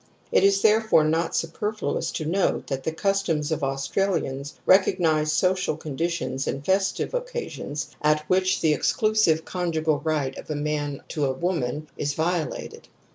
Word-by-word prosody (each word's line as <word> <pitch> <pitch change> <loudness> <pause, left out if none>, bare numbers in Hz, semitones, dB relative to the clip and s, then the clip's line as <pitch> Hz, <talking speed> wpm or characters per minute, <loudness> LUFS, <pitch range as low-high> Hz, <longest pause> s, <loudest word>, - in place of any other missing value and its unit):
It - - +4
is 195 0 +4
therefore 220 -6 +5
not 165 +2 0
superfluous 210 +6 -2
to 155 - -3
note 185 +5 0
that 135 0 -4
the 160 - 0
customs 165 -4 0
of 155 -2 -1
Australians 135 0 -1
recog 190 0 +5
nize 155 -2 +2
social 185 -1 +1
conditions 155 -3 -3
and 140 +1 -3
festive 195 - +1
occasions 480 - -4
at 150 0 +2
which 185 0 +2
the 155 -2 +4
exclusive 195 -1 +2
conjugal 160 -4 0
right 150 -4 -1
of - - -11
a 155 - -2
man 145 -1 -2
to 150 -2 -1
a 135 - +1
woman 150 -2 -2
is 145 -1 -2
violated. 165 0 -2
160 Hz, 150 wpm, -25 LUFS, 150-190 Hz, -, therefore